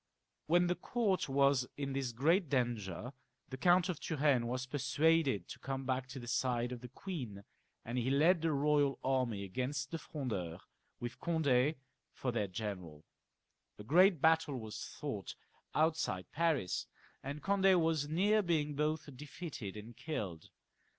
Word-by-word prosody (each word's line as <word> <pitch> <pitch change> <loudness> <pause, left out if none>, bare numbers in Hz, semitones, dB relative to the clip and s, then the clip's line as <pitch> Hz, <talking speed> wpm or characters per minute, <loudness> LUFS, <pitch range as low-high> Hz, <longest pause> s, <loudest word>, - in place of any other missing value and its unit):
When 175 +3 +4
the 175 - +2
court 200 - 0
was 140 -2 +3
in 140 -1 -3
this 135 -2 -1
great 160 - +2
danger 120 -3 -1 0.4
the 130 - -6
Count 175 +5 +4
of 180 -5 -3
Turenne 140 -6 +1
was 125 +1 -2
persuaded 140 - +2
to - - -8
come 135 0 -4
back 130 0 -1
to 130 +2 -8
the 120 -2 -7
side 120 0 0
of 125 -2 -6
the 125 - -7
queen, 125 - -6 0.4
and 120 +2 -2
he 120 +2 0
led 160 +5 +4
the 165 -1 +1
royal 145 -1 +2
army 125 -6 0
against 130 +7 -3
the 165 - -3
Frondeurs, 110 - -4 0.4
with 120 0 -6
Cond^ 150 -4 +2 0.4
for 130 - -2
their 105 -4 0
general 90 -6 -6 0.7
A 105 - -9
great 175 - +5
battle 160 -2 +3
was 110 -2 -6 0.2
fought - - -4 0.4
outside 155 - +1
Paris, 155 - 0 0.3
and 145 +2 -6
Cond^ 195 -2 +4
was 160 -3 +1
near 205 +7 +3
being 155 -5 0
both 150 +2 -1
defeated 140 - -7
and 110 +3 -9
killed. 100 - -5
135 Hz, 150 wpm, -35 LUFS, 120-160 Hz, 0.7 s, great